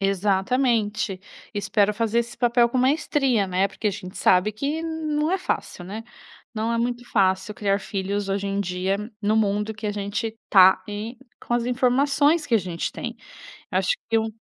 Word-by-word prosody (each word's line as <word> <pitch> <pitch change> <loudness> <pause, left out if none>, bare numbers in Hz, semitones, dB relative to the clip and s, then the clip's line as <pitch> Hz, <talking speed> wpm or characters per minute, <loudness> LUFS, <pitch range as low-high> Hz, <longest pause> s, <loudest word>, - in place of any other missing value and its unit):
Exatamente, 205 +1 +1 0.3
espero 205 0 +1
fazer 225 +1 0
esse 235 0 -2
papel 240 0 +3
com 240 - -3
maestria, 265 -4 +2
né, 185 +1 +1
porque 200 +3 -5
a - - +3
gente 185 -1 -8
sabe 185 +3 +4
que 280 +9 -3
não 315 -1 -1
é 380 - +1
fácil, 190 - -3
né. 210 +4 -6 0.5
Não 225 +1 -1
é 230 - 0
muito 240 +1 -2
fácil 190 0 +2
criar 200 -1 0
filhos 200 0 -3
hoje 200 +1 -1
em 200 0 -1
dia 185 +1 -1 0.2
no 215 +1 +1
mundo 210 0 +1
que 215 0 -6
a - - 0
gente 205 +2 -3
tá, 190 -1 +7
eh, 210 +4 -5 0.3
com - - -4
as 240 -1 +2
informações 280 +5 +2
que 240 - +1
a - - +6
gente 175 -3 -4
tem. - - -5 0.5
Eu - - +1
acho - - +1
que 225 - +4
um 220 0 -2
215 Hz, 185 wpm, -24 LUFS, 200-245 Hz, 0.5 s, tá